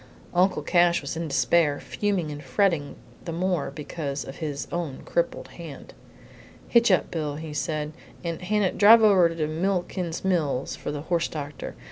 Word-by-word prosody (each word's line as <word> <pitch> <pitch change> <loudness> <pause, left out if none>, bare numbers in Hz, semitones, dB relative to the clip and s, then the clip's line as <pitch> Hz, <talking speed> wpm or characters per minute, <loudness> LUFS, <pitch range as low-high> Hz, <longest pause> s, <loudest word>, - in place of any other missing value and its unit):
Uncle 180 +2 +2
Cash 175 -1 +4
was 140 +1 -5
in 165 0 -3
despair, 150 0 +2
fuming 195 -7 -2
and 145 0 -7
fretting 145 +1 +1 0.3
the 170 - -5
more 175 -2 0
because 140 0 -5
of 135 - -9
his 150 -4 -4
own 165 -6 -4
crippled - - -1
hand. - - -10 0.7
"Hitch 235 -1 +4
up, 185 - +2
Bill," 150 -3 -2
he 155 0 -7
said, 150 0 -2 0.3
"and, 170 0 -3
Hannah, 200 0 +1
you - - -10
drive 225 +2 +8
over 190 -5 +6
to 165 -2 -2
Milliken's 175 +1 -2
Mills 155 -8 0
for - - -5
the 145 -1 -4
horse 170 +1 0
doctor. 145 -2 -6
165 Hz, 165 wpm, -26 LUFS, 150-185 Hz, 0.7 s, drive